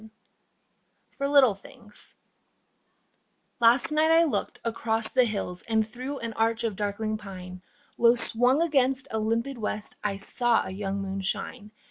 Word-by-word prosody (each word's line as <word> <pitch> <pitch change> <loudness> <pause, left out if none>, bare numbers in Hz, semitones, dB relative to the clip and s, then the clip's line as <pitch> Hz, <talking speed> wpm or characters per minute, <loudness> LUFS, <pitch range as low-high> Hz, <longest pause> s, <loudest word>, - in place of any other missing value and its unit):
48 - - -29
FOR 275 - -2
LITTLE 280 -6 +5
THINGS 210 +2 -10 1.4
Last 235 +5 +4
night 310 +1 +3
I 325 +1 +6
looked 320 - -2
across 225 -1 0
the 255 -1 +3
hills 195 -5 -4
And 220 -1 +2
through 255 +5 -6
an 230 -1 -4
arch 225 +1 0
of 225 -3 -1
darkling 215 +2 -2
pine 185 -3 -9 0.4
Low 235 0 +6
swung 245 +5 +3
against 270 -4 +1
a 220 - -1
limpid 230 +4 -1
west 210 -1 -4
I 200 -1 -1
saw 235 +4 +1
a - - -6
young 195 0 -3
moon 195 0 -4
shine. 210 +3 -2
225 Hz, 150 wpm, -27 LUFS, 205-255 Hz, 1.4 s, I